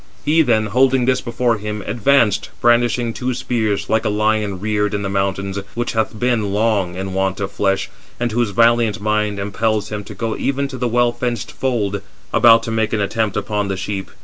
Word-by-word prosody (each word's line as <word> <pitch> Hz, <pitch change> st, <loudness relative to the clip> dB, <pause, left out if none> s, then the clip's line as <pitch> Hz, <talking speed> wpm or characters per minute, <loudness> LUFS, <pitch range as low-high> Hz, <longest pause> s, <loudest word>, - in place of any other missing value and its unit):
He 160 Hz, +2 st, +4 dB
then, 115 Hz, -7 st, +2 dB
holding 130 Hz, +3 st, +3 dB
this 130 Hz, 0 st, +2 dB
before 120 Hz, -1 st, 0 dB
him, 105 Hz, 0 st, -5 dB
advanced, 115 Hz, -4 st, +2 dB
brandishing 120 Hz, 0 st, +2 dB
two 125 Hz, +1 st, -2 dB
spears, 110 Hz, -5 st, -1 dB
like 110 Hz, 0 st, +1 dB
a -, -, 0 dB
lion 105 Hz, -2 st, 0 dB
reared 105 Hz, 0 st, 0 dB
in 100 Hz, -, -2 dB
the 100 Hz, -, -2 dB
mountains, 95 Hz, 0 st, -1 dB, 0.2 s
which 120 Hz, 0 st, -1 dB
hath 110 Hz, -1 st, -1 dB
been 120 Hz, -5 st, +1 dB
long 100 Hz, -4 st, +1 dB
in 95 Hz, 0 st, -4 dB
want 95 Hz, 0 st, -1 dB
of 100 Hz, -1 st, -3 dB
flesh, 95 Hz, -1 st, 0 dB, 0.3 s
and 120 Hz, -1 st, -1 dB
whose 120 Hz, 0 st, +1 dB
valiant 115 Hz, +1 st, +3 dB
mind 105 Hz, -1 st, 0 dB
impels 105 Hz, +1 st, -1 dB
him 105 Hz, -1 st, -4 dB
to 105 Hz, -, -9 dB
go 115 Hz, +2 st, -2 dB
even 140 Hz, 0 st, -1 dB
to 130 Hz, -2 st, -7 dB
the 125 Hz, -, 0 dB
well 120 Hz, +1 st, +2 dB
fenced 120 Hz, -2 st, -3 dB
fold, 105 Hz, -7 st, -1 dB, 0.3 s
about 115 Hz, -1 st, +6 dB
to 115 Hz, -, -4 dB
make 110 Hz, -1 st, 0 dB
an 110 Hz, -, +1 dB
attempt 105 Hz, 0 st, -1 dB
upon 105 Hz, 0 st, -1 dB
the 95 Hz, -1 st, -2 dB
sheep. 95 Hz, 0 st, -4 dB
110 Hz, 200 wpm, -19 LUFS, 100-120 Hz, 0.3 s, about